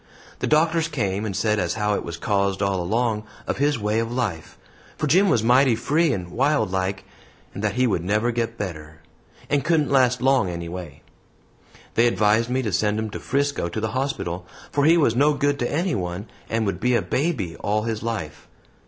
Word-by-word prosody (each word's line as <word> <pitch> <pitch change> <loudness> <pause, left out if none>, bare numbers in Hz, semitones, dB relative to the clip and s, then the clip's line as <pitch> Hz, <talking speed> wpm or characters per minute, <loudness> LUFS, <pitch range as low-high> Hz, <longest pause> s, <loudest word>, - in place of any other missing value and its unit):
The - - -1
doctors 160 +1 +3
came 105 -9 -2
and 100 -3 -3
said 110 +1 +1
as 85 -2 -1
how 105 -1 0
it - - -2
was 85 -1 -6
caused 100 +1 0
all 95 -2 0
along 110 +3 0 0.2
of - - -2
his 145 0 +2
way 105 +1 0
of 115 0 -2
life 105 -11 -3 0.4
for - - -1
Jim 185 +7 +4
was 115 - +2
mighty 125 +1 +5
free 150 +7 +1
and 90 -7 -4
wild 130 -6 +1
like 95 0 -2 0.5
and 100 - -6
that 105 0 0
he 130 0 +3
would 95 -8 0
never 105 +6 +1
get 115 -1 -2
better, 75 -5 -6 0.5
and 145 -1 +1
couldn't 155 -4 +1
last 125 -2 +3
long 130 -6 +3
anyway. 85 -3 -7 0.9
They 120 +1 +4
advised 110 +1 +2
me 130 +1 0
to 110 - -2
send 105 +3 +1
him 110 -1 -3
to - - -5
Frisco 140 -9 -1
to 100 - -4
the 110 0 -1
hospital, 95 -9 -3 0.2
for 145 0 +2
he 165 +2 +6
was 130 -8 +3
no 145 +3 +3
good 145 0 0
to 120 - -1
anyone 105 - -2 0.2
and 115 0 0
would 95 -3 -2
be 125 +3 +2
a 115 - +1
baby 125 - -1
all 105 +1 -1
his 110 -1 -3
life. 115 -10 -5
110 Hz, 200 wpm, -23 LUFS, 95-135 Hz, 0.9 s, he